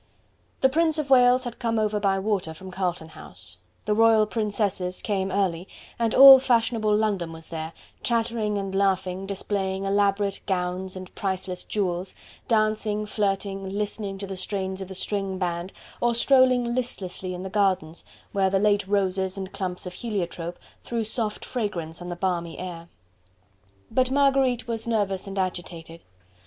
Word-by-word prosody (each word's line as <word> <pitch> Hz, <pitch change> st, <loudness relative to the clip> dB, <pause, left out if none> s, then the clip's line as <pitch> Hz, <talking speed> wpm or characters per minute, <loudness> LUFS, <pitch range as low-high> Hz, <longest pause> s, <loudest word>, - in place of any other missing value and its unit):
The 265 Hz, -, +5 dB
Prince 320 Hz, +2 st, +2 dB
of 290 Hz, -3 st, -3 dB
Wales 250 Hz, 0 st, +6 dB
had 240 Hz, -2 st, -6 dB
come 230 Hz, -2 st, 0 dB
over 215 Hz, -1 st, +1 dB
by 195 Hz, -1 st, +2 dB
water 190 Hz, -5 st, -1 dB
from 190 Hz, +3 st, -10 dB
Carlton 180 Hz, -3 st, -2 dB
House; 90 Hz, -, -11 dB, 0.3 s
the 210 Hz, -, +2 dB
Royal 225 Hz, 0 st, +5 dB
Princesses 205 Hz, -4 st, -1 dB
came 195 Hz, -2 st, -1 dB
early, 185 Hz, -2 st, 0 dB, 0.3 s
and 230 Hz, -1 st, +1 dB
all 270 Hz, 0 st, +11 dB
fashionable 230 Hz, -4 st, +2 dB
London 200 Hz, -6 st, 0 dB
was 160 Hz, 0 st, -9 dB
there, 160 Hz, -1 st, -5 dB, 0.3 s
chattering 225 Hz, -3 st, 0 dB
and 195 Hz, -1 st, -3 dB
laughing, 190 Hz, -1 st, 0 dB
displaying 195 Hz, -1 st, -2 dB
elaborate 200 Hz, 0 st, +1 dB
gowns 185 Hz, 0 st, -2 dB
and 185 Hz, -1 st, -9 dB
priceless 185 Hz, -2 st, -3 dB
jewels, 185 Hz, -2 st, -2 dB, 0.3 s
dancing, 215 Hz, -1 st, +1 dB
flirting, 195 Hz, -2 st, -2 dB
listening 205 Hz, -1 st, -3 dB
to 200 Hz, -, -5 dB
the 195 Hz, 0 st, -6 dB
strains 190 Hz, 0 st, -3 dB
of 190 Hz, -, -5 dB
the 190 Hz, -, -8 dB
string 195 Hz, 0 st, -2 dB
band, 175 Hz, 0 st, -2 dB, 0.3 s
or 240 Hz, -1 st, +2 dB
strolling 255 Hz, -1 st, +4 dB
listlessly 190 Hz, -7 st, -3 dB
in 180 Hz, -, -6 dB
the 190 Hz, -, -5 dB
gardens, 190 Hz, -6 st, 0 dB, 0.3 s
where 195 Hz, -1 st, +2 dB
the 195 Hz, -, +2 dB
late 205 Hz, -1 st, +2 dB
roses 190 Hz, -1 st, 0 dB
and 190 Hz, -1 st, -5 dB
clumps 180 Hz, -2 st, -4 dB
of 180 Hz, -, -6 dB
heliotrope 180 Hz, -5 st, -4 dB, 0.2 s
threw 235 Hz, -1 st, -2 dB
soft 215 Hz, -1 st, -2 dB
fragrance 175 Hz, -9 st, -4 dB
on 175 Hz, -, -7 dB
the 175 Hz, -, -4 dB
balmy 175 Hz, -2 st, -2 dB
air. 170 Hz, -2 st, -7 dB, 1.0 s
But 255 Hz, -1 st, +2 dB
Marguerite 270 Hz, -3 st, +2 dB
was 230 Hz, -1 st, -3 dB
nervous 200 Hz, -4 st, 0 dB
and 195 Hz, 0 st, -6 dB
agitated. 170 Hz, -3 st, -4 dB
195 Hz, 155 wpm, -25 LUFS, 185-220 Hz, 1.0 s, all